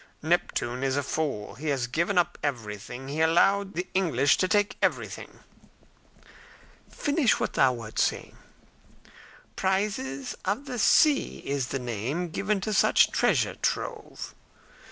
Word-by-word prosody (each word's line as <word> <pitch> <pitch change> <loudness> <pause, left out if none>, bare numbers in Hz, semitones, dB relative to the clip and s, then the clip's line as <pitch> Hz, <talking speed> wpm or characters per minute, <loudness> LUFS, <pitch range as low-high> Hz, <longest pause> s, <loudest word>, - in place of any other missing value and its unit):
"Neptune 140 -6 0
is 135 0 0
a 145 - 0
fool. 140 -8 -3
He 155 +4 -7
has 135 -4 0
given 170 +10 -1
up 175 - +2
everything. 125 -2 -5
He 145 +3 -4
has 160 0 +4
allowed 195 +4 +3
the 180 +2 -2
English 145 -7 +3
to 185 - +1
take 205 +2 +1
everything." - - -2 1.5
"Finish 285 -5 +1
what - - -2
thou 130 -2 +4
wert 115 -3 -6
saying." - - -1 1.2
"'Prizes 190 -9 -1
of 210 +9 -2
the 250 -3 -5
sea' 295 +6 +3
is 140 -2 -1
the 135 - -2
name 125 - -3
given 200 +5 -1
to 215 +2 -2
such - - +4
treasure - - +2
trove." - - -3
155 Hz, 135 wpm, -27 LUFS, 130-195 Hz, 1.5 s, has